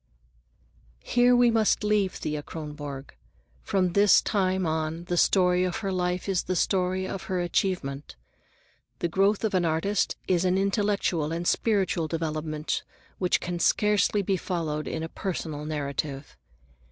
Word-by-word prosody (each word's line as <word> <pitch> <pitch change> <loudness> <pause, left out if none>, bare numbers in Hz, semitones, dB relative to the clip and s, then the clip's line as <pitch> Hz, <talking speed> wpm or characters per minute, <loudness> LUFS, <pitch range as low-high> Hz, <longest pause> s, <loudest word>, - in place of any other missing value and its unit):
Here 245 0 +4
we 245 -1 +5
must 220 -2 +2
leave 210 -2 +1
Thea 150 -1 -4
Kronborg. 145 -3 -7 0.5
From 185 -2 +1
this 200 -1 +6
time 190 -3 0
on 160 +1 -2
the 175 0 -2
story 180 0 +3
of 180 -1 -1
her 195 - 0
life 180 0 -1
is 190 -3 +1
the 185 - -3
story 185 +1 0
of 190 - -5
her 185 -1 -2
achievement. 175 -5 -2 0.8
The - - -1
growth 195 +5 +2
of 220 - 0
an 185 -2 +2
artist 165 +5 0
is 180 -1 +2
an 185 0 +2
intellectual 195 -5 0
and 170 +1 -3
spiritual 195 -7 +1
development 155 -1 -2 0.4
which 180 -2 +2
can 175 -1 -4
scarcely 210 +2 +2
be 190 0 0
followed 160 -5 -3
in 160 - -3
a - - -3
personal 160 -4 -4
narrative. 140 -1 -4
180 Hz, 145 wpm, -26 LUFS, 160-195 Hz, 0.8 s, this